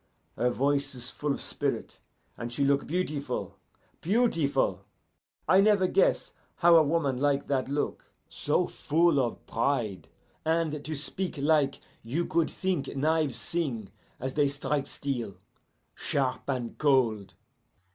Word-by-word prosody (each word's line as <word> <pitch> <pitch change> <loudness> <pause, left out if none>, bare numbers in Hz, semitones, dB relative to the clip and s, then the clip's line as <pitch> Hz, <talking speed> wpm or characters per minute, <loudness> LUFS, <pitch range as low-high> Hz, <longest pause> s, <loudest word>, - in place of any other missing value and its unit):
Her 125 - +2
voice 140 +2 0
is 125 +1 -5
full 150 -1 -2
of - - -2
spirit - - -2 0.4
and 120 0 -6
she 140 +3 0
look 140 0 +2
beautiful 150 -6 -3 0.4
beautiful. 180 - +1 0.6
I 185 +4 +6
never 200 -2 +4
guess 185 +1 +2 0.2
how 170 0 +6
a 165 - +8
woman 145 -4 +1
like 140 +1 +1
that 130 -2 0
look; 145 +1 -3 0.2
so - - 0
full 165 -1 +2
of 120 -3 -2
pride, 115 -6 -1 0.4
and 160 -2 0
to 155 +1 -4
speak 170 +4 -4
like 145 -1 +2 0.2
you 145 +10 -2
could 170 -1 +1
think 185 -8 -2
knives 150 -2 +1
sing 125 - -3 0.3
as 130 +1 -3
they 145 -1 +3
strike 140 0 -2
steel 120 -12 -4 0.6
sharp 135 -1 -2
and 125 -4 -3
cold. 115 -9 +2
140 Hz, 135 wpm, -28 LUFS, 130-160 Hz, 0.6 s, a